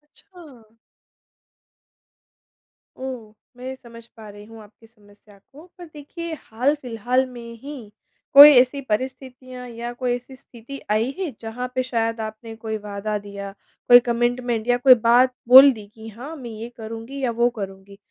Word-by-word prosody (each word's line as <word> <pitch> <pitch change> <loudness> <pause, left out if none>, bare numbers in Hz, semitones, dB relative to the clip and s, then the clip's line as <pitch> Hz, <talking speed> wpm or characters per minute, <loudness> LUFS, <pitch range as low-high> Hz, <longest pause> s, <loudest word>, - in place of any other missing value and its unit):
अच्छा। 275 - -18 2.2
ओह! 250 -5 -8 0.2
मैं 260 +1 -7
समझ 230 -2 -15
पा 215 -1 -12
रही 205 +1 -13
हूँ 225 0 -14
आपकी 220 +2 -21
समस्या 205 -2 -23
को, 300 +5 -15
पर 350 - -10
देखिए 325 +3 -8
हाल-फ़िलहाल 250 0 -1
में 235 -1 -10
ही 270 -7 -10 0.4
कोई 285 +2 +12
ऐसी 260 +3 +3
परिस्थितियाँ 255 +1 -6
या 235 +1 -7
कोई 245 0 -2
ऐसी 250 +2 -11
स्थिति 250 +2 -12
आई 225 +5 0
है। 350 -7 -3
जहाँ 235 +3 -5
पे 255 - 0
शायद 230 -2 -2
आपने 220 +1 -8
कोई 220 -1 -5
वादा 210 0 -5
दिया, 200 -1 -9 0.4
कोई 245 0 +9
कमिटमेंट 240 -1 -2
या 245 0 +2
कोई 255 +1 +7
बात 245 +3 +3
बोल 265 +3 +9
दी 215 -2 -11
कि 220 0 -12
हाँ, 260 +9 -10
मैं 250 -5 -9
ये 225 +2 -8
करूँगी 225 +5 -8
या 240 - 0
वो 235 +1 +1
करूँगी 195 -3 -9
240 Hz, 150 wpm, -22 LUFS, 220-260 Hz, 2.2 s, कोई